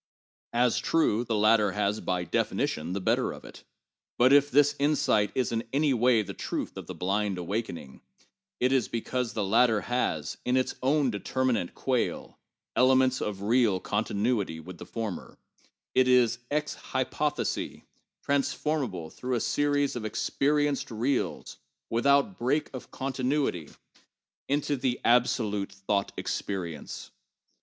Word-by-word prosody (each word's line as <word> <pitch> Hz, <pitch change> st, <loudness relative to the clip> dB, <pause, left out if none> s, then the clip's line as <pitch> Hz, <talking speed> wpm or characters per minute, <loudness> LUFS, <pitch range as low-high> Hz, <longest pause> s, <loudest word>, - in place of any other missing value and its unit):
As 120 Hz, 0 st, +2 dB
trues, 120 Hz, -8 st, +1 dB
the 115 Hz, -, 0 dB
latter 105 Hz, -1 st, +4 dB
has 105 Hz, +1 st, 0 dB
by 90 Hz, -1 st, -1 dB
defi 85 Hz, -, -1 dB
nition 80 Hz, +3 st, -1 dB
the 100 Hz, -, -2 dB
better 95 Hz, -, +1 dB
of -, -, -10 dB
it; -, -, -12 dB, 0.5 s
but 130 Hz, +3 st, +5 dB
if 145 Hz, 0 st, +5 dB
this 145 Hz, +2 st, +4 dB
insight 140 Hz, -8 st, +2 dB
is 130 Hz, -, 0 dB
in 115 Hz, 0 st, -1 dB
any 145 Hz, 0 st, +2 dB
way 120 Hz, -2 st, +3 dB
the 100 Hz, 0 st, -7 dB
truth -, -, -4 dB
of -, -, -8 dB
the -, -, -6 dB
blind 100 Hz, +1 st, -1 dB
awakening, 90 Hz, -, -5 dB, 0.6 s
it 125 Hz, +1 st, +2 dB
is 130 Hz, -3 st, +2 dB
because 120 Hz, +1 st, -2 dB
the 105 Hz, -, -1 dB
latter 110 Hz, +1 st, +3 dB
has, 90 Hz, -10 st, -2 dB
in 125 Hz, +1 st, +1 dB
its 130 Hz, -, 0 dB
own 135 Hz, 0 st, +2 dB
deter 125 Hz, +5 st, -2 dB
minate 115 Hz, -9 st, 0 dB
quale, 130 Hz, -2 st, -2 dB, 0.4 s
elements 130 Hz, 0 st, +4 dB
of 100 Hz, -2 st, -3 dB
real 110 Hz, -3 st, +3 dB
continuity 105 Hz, -3 st, -1 dB
with 85 Hz, +2 st, -10 dB
the -, -, -9 dB
former; 110 Hz, -6 st, -5 dB, 0.6 s
it 130 Hz, 0 st, +4 dB
is, 125 Hz, -2 st, +4 dB
ex 150 Hz, +1 st, -1 dB, 0.2 s
hypothesi, -, -, -1 dB, 0.4 s
transformable 135 Hz, -, -1 dB
through 125 Hz, 0 st, -3 dB
a -, -, +1 dB
series 145 Hz, +2 st, +1 dB
of 120 Hz, -, -4 dB
experienced 145 Hz, +6 st, 0 dB
reals, 125 Hz, +4 st, -2 dB, 0.3 s
with 115 Hz, +4 st, +1 dB
out 140 Hz, +7 st, +3 dB
break 140 Hz, +6 st, 0 dB
of 130 Hz, -, -8 dB
continuity 130 Hz, -, -1 dB, 0.8 s
into 145 Hz, +1 st, +1 dB
the 125 Hz, -2 st, -1 dB
absolute 110 Hz, -4 st, +2 dB
thought 100 Hz, 0 st, -1 dB
experience. 85 Hz, -7 st, -4 dB
120 Hz, 145 wpm, -28 LUFS, 105-135 Hz, 0.8 s, but